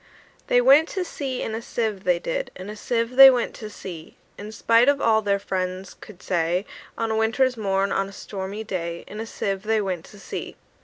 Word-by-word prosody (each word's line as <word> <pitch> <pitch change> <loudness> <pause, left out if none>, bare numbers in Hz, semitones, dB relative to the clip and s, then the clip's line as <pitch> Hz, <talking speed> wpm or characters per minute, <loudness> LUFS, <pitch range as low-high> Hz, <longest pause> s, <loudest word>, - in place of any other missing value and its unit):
They 245 - +4
went 280 +6 +6
to 375 -2 -3
sea 270 -6 -4
in 220 - -4
a 225 - -3
sieve, 220 -5 -3
they 180 -1 +3
did; - - -3
In 185 +3 -7
a - - -8
sieve 230 +3 -2
they 270 0 +12
went 250 -2 0
to 215 - -7
sea: 170 -6 -10 0.2
In 210 +1 -8
spite 230 +3 +4
of 285 -1 +2
all 220 -3 +3
their 200 -1 +1
friends 185 -1 -4
could 195 -4 -14
say, 175 +2 0 0.3
On 225 -1 -1
a - - 0
winter's 230 +4 +2
morn, 195 -2 0
on 195 0 0
a - - -11
stormy 195 +1 -6
day, 170 -5 -4
In 210 - -9
a 225 - -5
sieve 195 -3 -3
they 220 +1 +1
went 185 -5 -3
to 210 - -15
sea. 195 - -7
215 Hz, 215 wpm, -24 LUFS, 190-230 Hz, 0.3 s, they